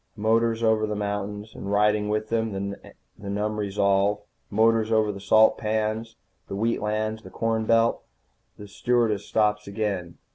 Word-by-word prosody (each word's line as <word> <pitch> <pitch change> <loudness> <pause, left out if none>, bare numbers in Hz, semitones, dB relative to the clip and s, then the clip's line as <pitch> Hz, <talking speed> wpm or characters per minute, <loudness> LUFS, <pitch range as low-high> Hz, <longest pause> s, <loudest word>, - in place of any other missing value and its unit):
Motors 115 +2 +1
over 110 -1 +2
the 105 - -3
mountains. 105 +1 -4
And 100 - -6
riding 105 0 +2
with 105 +1 -1
them, 100 -4 -1
the 100 0 -14
numb 105 +1 -2
resolve. 100 0 +1 0.3
Motors 110 +1 +2
over 110 -1 +3
the 100 - -8
salt 110 +2 +4
pans, 110 +1 -2 0.3
the - - -5
wheat 115 +3 0
lands, 110 +1 -2
the - - -12
corn 115 -1 -1
belt. 115 0 +3 0.6
The 105 - -10
stewardess 110 -1 0
stops 105 -1 +1
again. 100 -4 -3
105 Hz, 150 wpm, -25 LUFS, 105-110 Hz, 0.6 s, salt